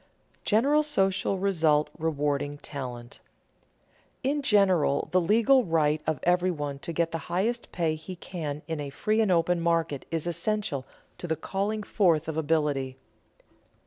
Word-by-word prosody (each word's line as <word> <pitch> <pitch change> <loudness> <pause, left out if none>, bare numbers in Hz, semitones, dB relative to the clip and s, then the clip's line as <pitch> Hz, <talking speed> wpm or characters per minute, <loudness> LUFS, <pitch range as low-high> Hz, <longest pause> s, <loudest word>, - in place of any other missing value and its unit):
[Sidenote: - - -38
General 275 +8 +4
social 195 -9 +1
result 160 -6 +2
of - - -19
rewarding 145 -2 -1
talent] 125 -4 -7 1.0
In 285 +3 0
general 190 - +3
the 185 - +3
legal 230 +8 +4
right 155 -4 +1
of 155 -4 0
everyone 175 -6 0
to 170 - -5
get 165 0 0
the 165 - -3
highest 220 +7 -1
pay 165 -3 0
he 160 +4 -7
can 155 -4 -6
in 160 -2 -3
a 145 -1 -4
free 215 +10 0
and 210 -4 +2
open 170 0 +2
market 165 -4 0
is 165 -1 -2
essential 175 - -2 0.3
to 175 - -5
the 160 - 0
calling 205 +6 -2
forth 170 -8 +2
of 160 - -3
ability. 145 -4 0
165 Hz, 150 wpm, -27 LUFS, 150-195 Hz, 1.0 s, General